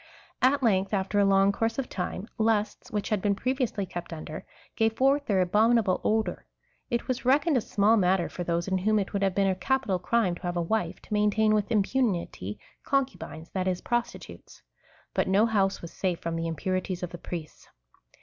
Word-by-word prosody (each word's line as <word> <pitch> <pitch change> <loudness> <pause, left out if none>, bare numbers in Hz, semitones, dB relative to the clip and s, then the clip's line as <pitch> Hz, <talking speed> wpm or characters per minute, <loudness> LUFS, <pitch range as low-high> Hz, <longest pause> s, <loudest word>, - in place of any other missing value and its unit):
At 265 +2 +3
length, 195 -2 +2
after 195 +1 0
a 200 - +5
long 195 0 +4
course 225 +3 -1
of 270 - -2
time, 185 +2 -4
lusts, 220 -1 0
which 210 -1 -2
had 210 -3 0
been 200 0 +1
previously 250 -3 -1
kept 175 -1 -7
under, 155 -1 -7 0.3
gave 225 0 +2
forth 275 +2 +3
their 195 -3 +3
abominable 210 +1 +3
odour. 220 0 0 0.4
It 235 -2 -1
was 255 0 -2
reckoned 285 +5 +3
a 250 - +3
small 215 +2 +3
matter 185 -2 +2
for 180 - -5
those, 170 +1 -1
in 190 -1 0
Avhom 215 +3 +2
it 195 - -3
would 200 - -1
have 195 -2 +1
been 200 - +3
a 190 - +2
capital 200 0 0
crime 200 0 +1
to 175 - -9
have 175 -2 -3
a - - +1
wife, 215 +6 -1
to - - -7
maintain 210 +1 +3
with 210 -1 +1
impunity 200 - 0 0.2
concubines, 270 - -2
that 185 -1 -2
is, 180 -1 -1
prostitutes; 240 0 -4 0.5
but - - +1
no 195 +4 +4
house 200 -5 +1
was 170 - -8
safe 180 -3 -1
from 165 0 -3
the 165 0 -2
impurities 185 +2 -2
of 175 - -4
the 175 - -8
priests. 165 -3 -7
200 Hz, 195 wpm, -27 LUFS, 185-225 Hz, 0.5 s, a